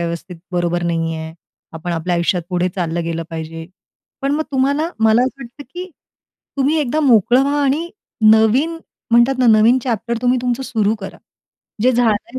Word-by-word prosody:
व्यवस्थित 170 Hz, +1 st, -5 dB, 0.2 s
बरोबर 175 Hz, 0 st, 0 dB
नाही 165 Hz, -1 st, -1 dB
आहे. 160 Hz, 0 st, -7 dB, 0.4 s
आपण 170 Hz, +2 st, -4 dB
आपल्या 170 Hz, +2 st, -1 dB
आयुष्यात 170 Hz, +1 st, 0 dB
पुढे 180 Hz, 0 st, 0 dB
चाललं 170 Hz, -2 st, -2 dB
गेलं 165 Hz, 0 st, -3 dB
पाहिजे, 165 Hz, 0 st, -6 dB, 0.6 s
पण 275 Hz, -, 0 dB
मग 315 Hz, -, 0 dB
तुम्हाला 280 Hz, +4 st, +1 dB, 0.2 s
मला 220 Hz, +2 st, +5 dB
असं 265 Hz, +1 st, -3 dB
वाटतं, 245 Hz, +4 st, -11 dB
की 365 Hz, +1 st, -6 dB, 0.7 s
तुम्ही 280 Hz, +3 st, +1 dB
एकदा 295 Hz, +2 st, 0 dB
मोकळं 245 Hz, -2 st, +4 dB
व्हा 285 Hz, +1 st, 0 dB
आणि 295 Hz, +5 st, 0 dB, 0.4 s
नवीन 230 Hz, +10 st, +3 dB, 0.3 s
म्हणतात 240 Hz, +3 st, +4 dB
ना 255 Hz, -, +3 dB
नवीन 235 Hz, +4 st, +5 dB
चॅप्टर 235 Hz, -1 st, -2 dB
तुम्ही 250 Hz, +1 st, +2 dB
तुमचं 250 Hz, +1 st, -1 dB
सुरु 220 Hz, -5 st, 0 dB
करा. 195 Hz, -, -8 dB, 0.7 s
जे 255 Hz, +2 st, +4 dB
झालंय 235 Hz, +1 st, 0 dB
230 Hz, 165 wpm, -18 LUFS, 175-265 Hz, 0.7 s, मला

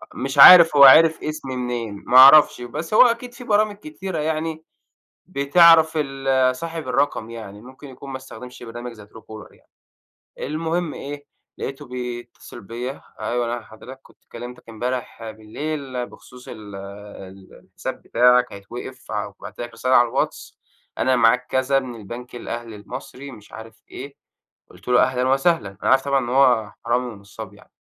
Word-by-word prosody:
مش 135 Hz, +2 st, -5 dB
عارف 165 Hz, +1 st, +9 dB
هو 140 Hz, -, +8 dB
عِرَف 160 Hz, +4 st, +7 dB
اسمي 150 Hz, -4 st, -5 dB
منين، 120 Hz, -5 st, -5 dB
ما 125 Hz, -, +4 dB
أعرفش 140 Hz, 0 st, +8 dB
بس 150 Hz, -, -6 dB
هو -, -, +6 dB
أكيد 245 Hz, 0 st, +2 dB
فيه 245 Hz, 0 st, -12 dB
برامج 215 Hz, -2 st, +1 dB
كتيرة 200 Hz, -, -7 dB
يعني 160 Hz, +1 st, -3 dB, 0.6 s
بتعرَف 160 Hz, +1 st, +5 dB
ال 135 Hz, -3 st, 0 dB
صاحب 165 Hz, 0 st, -7 dB
الرقم 125 Hz, -4 st, -1 dB
يعني، 105 Hz, -3 st, -10 dB
ممكن 130 Hz, +4 st, -14 dB
يكون 135 Hz, +1 st, -12 dB
ما 130 Hz, -, -5 dB
استخدمش 125 Hz, -1 st, -12 dB
برنامج 120 Hz, +1 st, -8 dB
زي 105 Hz, -3 st, -14 dB
truecaller 110 Hz, 0 st, -13 dB
يعني، -, -, -27 dB, 0.7 s
المهم 165 Hz, +3 st, -3 dB
إيه 145 Hz, +1 st, -8 dB, 0.3 s
لقيتُه 140 Hz, +2 st, -7 dB
بيتصل 125 Hz, -1 st, -8 dB
بيَّ، 120 Hz, +5 st, -6 dB, 0.3 s
أيوه 120 Hz, 0 st, -2 dB
أنا 120 Hz, -, -6 dB
حضرتك 125 Hz, +4 st, -13 dB
كنت -, -, -24 dB
كلّمتك 120 Hz, 0 st, -10 dB
إمبارح 115 Hz, 0 st, -5 dB
بالليل 130 Hz, +4 st, -6 dB
بخصوص 125 Hz, 0 st, -16 dB
ال 105 Hz, -2 st, -10 dB
ال 100 Hz, -1 st, -12 dB
الحساب -, -, -8 dB
بتاعك 125 Hz, +1 st, +3 dB
هيتوقف، 120 Hz, +6 st, -10 dB
وبَعَت -, -, -7 dB
لك 120 Hz, 0 st, -6 dB
رسالة 125 Hz, +3 st, -1 dB
على 120 Hz, -1 st, +5 dB
الواتس، -, -, -4 dB, 0.4 s
أنا 130 Hz, -1 st, +2 dB
معاك 125 Hz, +2 st, +3 dB
كذا 130 Hz, +1 st, +1 dB
من 130 Hz, -3 st, -6 dB
البنك 120 Hz, +3 st, -10 dB
الأهلي 115 Hz, -2 st, -7 dB
المصري 130 Hz, +6 st, -10 dB
مش 105 Hz, -5 st, -15 dB
عارف 110 Hz, 0 st, -12 dB
إيه، 140 Hz, +2 st, -10 dB, 0.5 s
قلت -, -, -16 dB
له 125 Hz, 0 st, +4 dB
أهلًا 125 Hz, 0 st, 0 dB
وسهلًا، 135 Hz, -, +1 dB
أنا -, -, +1 dB
عارف 135 Hz, +1 st, +3 dB
طبعًا 140 Hz, -1 st, +1 dB
إن 120 Hz, -, -5 dB
هو 125 Hz, -5 st, +2 dB
حرامي 125 Hz, +2 st, 0 dB
ونصاب 100 Hz, -2 st, -11 dB
يعني. -, -, -20 dB
125 Hz, 155 wpm, -21 LUFS, 115-145 Hz, 0.7 s, عارف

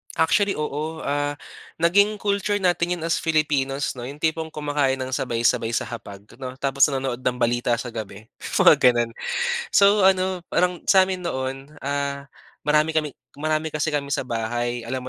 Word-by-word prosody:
Actually, 195 Hz, +5 st, +2 dB
oo. 150 Hz, +2 st, -4 dB
Ah, 145 Hz, 0 st, -1 dB, 0.5 s
naging 200 Hz, +5 st, +4 dB
culture 205 Hz, 0 st, 0 dB
natin 175 Hz, 0 st, +1 dB
yun 170 Hz, -, -8 dB
as 165 Hz, -2 st, 0 dB
Filipinos, 145 Hz, -3 st, 0 dB
'no? 120 Hz, -, -6 dB
Yung 145 Hz, +2 st, -10 dB
tipong 160 Hz, 0 st, 0 dB
kumakain 145 Hz, -3 st, 0 dB
ng 130 Hz, 0 st, -5 dB
sabay-sabay 115 Hz, -2 st, 0 dB
sa -, -, 0 dB
hapag, 100 Hz, -4 st, -9 dB, 0.2 s
'no? 130 Hz, -1 st, -6 dB
Tapos 135 Hz, +1 st, +3 dB
nanonood 135 Hz, -3 st, -2 dB
ng 125 Hz, -1 st, -1 dB
balita 120 Hz, 0 st, +1 dB
sa 120 Hz, +1 st, -6 dB
gabi, 110 Hz, -2 st, -7 dB, 0.3 s
mga -, -, +7 dB
gano'n. 120 Hz, -2 st, +3 dB, 0.6 s
So, 200 Hz, +1 st, +6 dB
ano, 185 Hz, -1 st, +2 dB
parang 180 Hz, 0 st, +1 dB
sa'min 190 Hz, -1 st, +4 dB
noon, 135 Hz, +2 st, -5 dB
ah, 140 Hz, 0 st, -2 dB, 0.4 s
marami 155 Hz, +2 st, +2 dB
kami 150 Hz, -3 st, 0 dB, 0.2 s
marami 155 Hz, +1 st, -1 dB
kasi 155 Hz, 0 st, -1 dB
kami 140 Hz, -1 st, -1 dB
sa -, -, -1 dB
bahay. 120 Hz, +1 st, -2 dB
Alam 130 Hz, +1 st, -3 dB
145 Hz, 160 wpm, -23 LUFS, 130-160 Hz, 0.6 s, mga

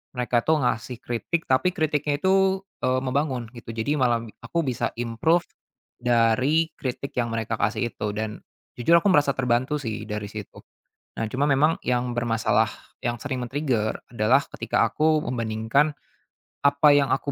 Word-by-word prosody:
mereka 125 Hz, -1 st, +1 dB
tuh 155 Hz, +4 st, +1 dB
ngasih 120 Hz, 0 st, -1 dB
kritik 140 Hz, +8 st, -2 dB
tapi 175 Hz, +8 st, +1 dB
kritiknya 150 Hz, -2 st, 0 dB
itu, 190 Hz, 0 st, +3 dB, 0.2 s
eee, 130 Hz, 0 st, +2 dB
membangun 130 Hz, -3 st, -1 dB
gitu. 115 Hz, -2 st, -9 dB
Jadi 145 Hz, +6 st, -1 dB
malah 120 Hz, -2 st, +2 dB, 0.2 s
aku 170 Hz, -1 st, -1 dB
bisa 130 Hz, -5 st, -2 dB
improve 120 Hz, +9 st, +1 dB, 0.6 s
dari 125 Hz, +7 st, +2 dB
kritik 135 Hz, +1 st, -4 dB
yang 120 Hz, -, +1 dB
mereka 115 Hz, 0 st, -2 dB
kasih 115 Hz, +1 st, 0 dB
itu 105 Hz, -1 st, -3 dB
dan 110 Hz, 0 st, -4 dB, 0.4 s
jujur 165 Hz, +8 st, +4 dB
aku 205 Hz, -, 0 dB
merasa 145 Hz, -4 st, +3 dB
terbantu 125 Hz, +2 st, +1 dB
sih 110 Hz, -5 st, -4 dB
dari 105 Hz, -1 st, -4 dB
situ. 105 Hz, -3 st, -9 dB, 0.5 s
Nah, 115 Hz, -, -1 dB
cuma 145 Hz, +3 st, +1 dB
memang 150 Hz, +4 st, +3 dB
yang 125 Hz, 0 st, 0 dB
bermasalah 115 Hz, -2 st, +1 dB, 0.3 s
yang 120 Hz, 0 st, -1 dB
sering 130 Hz, -2 st, -4 dB
men-trigger 125 Hz, -4 st, -1 dB, 0.2 s
adalah 110 Hz, +3 st, +4 dB, 0.2 s
ketika -, -, +1 dB
aku 155 Hz, 0 st, +2 dB
membandingkan 115 Hz, +5 st, +1 dB, 0.7 s
apa 140 Hz, +1 st, +5 dB
yang 145 Hz, -1 st, +4 dB
aku 140 Hz, +1 st, -1 dB
125 Hz, 155 wpm, -25 LUFS, 115-145 Hz, 0.7 s, apa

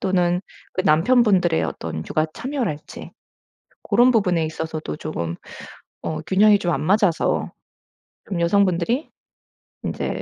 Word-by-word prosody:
또는 180 Hz, -1 st, +1 dB, 0.3 s
그 185 Hz, -, 0 dB
남편분들의 185 Hz, 0 st, +3 dB
어떤 80 Hz, -1 st, -4 dB
육아 155 Hz, 0 st, 0 dB
참여랄지 245 Hz, -, -5 dB, 0.7 s
고런 245 Hz, +1 st, +4 dB
부분에 180 Hz, -8 st, +2 dB
있어서도 160 Hz, -1 st, -5 dB
쪼금 85 Hz, -, -4 dB, 0.7 s
어 155 Hz, -1 st, -3 dB
균형이 205 Hz, +4 st, +4 dB
좀 175 Hz, -2 st, 0 dB
안 -, -, -1 dB
맞아서 190 Hz, 0 st, +1 dB, 0.8 s
좀 180 Hz, -4 st, -2 dB
여성분들이 195 Hz, -, +1 dB, 0.7 s
인제 -, -, -3 dB
180 Hz, 260 characters per minute, -22 LUFS, 160-205 Hz, 0.8 s, 고런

